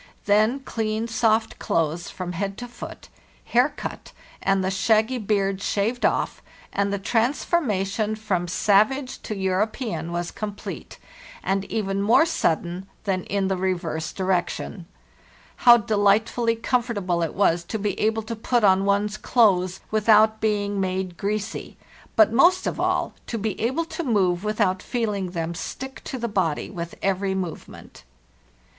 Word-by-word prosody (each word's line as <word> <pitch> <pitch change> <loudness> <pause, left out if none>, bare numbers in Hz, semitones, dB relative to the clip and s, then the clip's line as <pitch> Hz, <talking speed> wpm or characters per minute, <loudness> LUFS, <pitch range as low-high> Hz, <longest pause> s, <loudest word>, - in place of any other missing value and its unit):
Then 215 +6 +3
clean, 220 -3 -2
soft 225 -1 +1
clothes 165 +1 -1
from 180 -1 -5
head 195 +2 -3
to 245 - -6
foot, 240 - -10 0.4
hair - - +3
cut, - - -8 0.3
and 195 -1 +2
the 190 - 0
shaggy 220 +5 +2
beard 195 -2 0
shaved 220 +5 -1
off, - - -2 0.3
and 200 0 0
the 200 - 0
transformation 220 - 0
from 195 -5 -1
savage 215 +9 +2
to 215 - -5
European 190 - -1
was 175 0 -3
complete, 205 -1 -7 0.5
and 195 0 0
even 195 -2 -2
more 225 +10 +5
sudden 180 - -1 0.2
than 190 -3 -1
in 200 -1 0
the 190 - 0
reverse 175 -4 -2
direction. 185 -1 -2 0.7
How 240 -1 +8
delightfully 220 +2 +2
comfortable 225 -7 0
it 165 - -2
was 175 -3 +2
to 220 - -3
be 205 0 -1
able 220 +1 +1
to 230 +2 -5
put 235 +1 0
on 195 -1 +4
one's 205 +1 +1
clothes 190 -8 +2
without 215 0 +4
being 205 -2 0
made 185 -1 -2
greasy, 205 +2 -4 0.4
but, 220 0 +5
most 345 +9 +5
of - - -2
all, - - 0
to 230 - -3
be 210 -2 -3
able 265 +9 0
to 330 0 -5
move 190 - +1
with 215 +1 -2
out 185 -3 +2
feeling 210 -6 -2
them 170 -1 -3
stick 265 +9 -6
to 260 - -4
the 235 -1 -2
body 185 -8 -1
with 170 -3 -6
every 195 0 0
movement! 180 - -7
205 Hz, 150 wpm, -24 LUFS, 190-225 Hz, 0.7 s, How